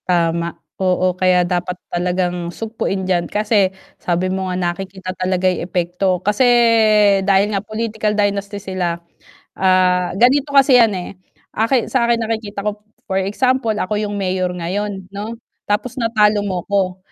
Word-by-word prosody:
Tama, 170 -1 0 0.2
oo 185 0 +2
kaya 185 -1 +2
dapat 180 0 -2 0.2
talagang 175 0 -1
sugpuin 195 -1 -3
diyan, 175 -2 0
kasi 210 -2 +2 0.3
sabi 180 +1 -1
mo 190 -1 -2
nga 180 - -2
nakikita 185 +1 -4
talaga 185 0 -1
'yung 185 -2 +2
epekto. 180 +1 0
Kasi, 210 +5 +2 0.8
dahil 200 +2 +2
nga 195 - 0
political 215 0 -2
dynasty 205 0 -1
sila, 185 -3 -3 0.6
ah, 185 -1 +2
ganito 270 +6 +3
kasi 275 -1 +5
yan 225 -3 +3
eh. 180 - -6 0.4
Aki 230 +2 +1
sa 250 -3 +2
akin 235 -1 +2
nakikita 215 -3 -4
ko 210 0 -3 0.2
for 190 0 -1
example 230 +4 0
ako 200 0 -2
'yung 205 -1 -3
mayor 185 -2 -1
ngayon 195 +3 -3
'no, 215 +3 -5 0.3
tapos 210 +4 -1
natalo 215 -2 +3
mo 185 -4 -3
ko, 190 -2 0
190 Hz, 145 wpm, -18 LUFS, 180-210 Hz, 0.8 s, kasi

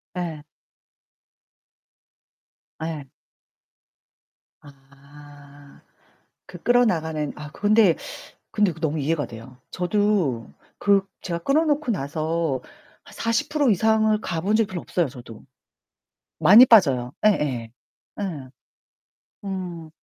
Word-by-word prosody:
예. 170 -4 -4 2.4
예. 155 -4 -5 1.5
아. 145 +1 -17 0.7
그 175 - -11
끌어나가는 160 -11 +1
아 150 0 -9
근데 205 -1 +3 0.6
근데 210 -3 +2
그거 160 - -15
너무 155 +1 -3
이해가 150 +1 -1
돼요. 115 +2 -12
저도 180 - 0 0.2
그 200 -1 +2 0.2
제가 170 -2 -4
끊어 275 - +2
놓고 295 -4 0
나서 155 - -2 0.4
한 - - -16
40% 255 +4 0
이상을 220 +1 +2
가 165 -5 -3
본 205 +4 +1
적이 225 -2 +2
별로 180 -3 -6
없어요 175 -3 -1
저도. 120 -4 -12 0.9
많이 205 +10 +8
빠져요. 135 - +4
예예. 135 - +1 0.5
예. - - -2 1.2
음. 180 -4 -6
165 Hz, 175 characters per minute, -23 LUFS, 145-210 Hz, 2.4 s, 많이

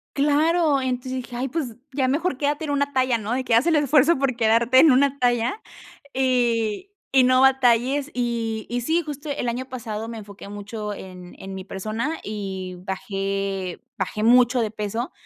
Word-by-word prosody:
Claro, 300 +1 +3
entonces 255 0 -3
dije: 245 - -10
"Ay, 255 +2 -2
pues 275 -7 -3 0.2
ya 265 -2 +1
mejor, 300 +2 0
quédate 290 +2 -1
en 300 - -4
una 285 0 0
talla, 255 -2 +2
¿no?, 220 +2 -3
de 260 +1 -1
que 240 - -1
haz 235 +8 +4
el 330 - +4
esfuerzo 295 +1 +4
por 265 -3 0
quedarte 235 +3 +4
en 305 -1 +7
una 280 +1 +2
talla 245 - +1 0.5
y 245 - 0 0.2
y 265 -1 +5
no 255 +1 +4
batalles", 265 +2 +3
y 230 -3 -2
y 245 +1 -1
sí, 320 +8 +1
justo 295 -1 -7
el 245 -4 -2
año 250 +2 -3
pasado 225 -4 -5
me 230 -1 -6
enfoqué 200 -1 -11
mucho 205 +1 -6
en 180 -2 -10
en 195 0 -8
mi 190 -1 -7
persona 220 +11 -3
y 190 -3 -5
bajé 195 -1 -3 0.2
bajé 215 - -3
mucho 245 +1 +5
de 220 -1 -1
peso. 220 - -4
245 Hz, 180 wpm, -23 LUFS, 215-275 Hz, 0.5 s, en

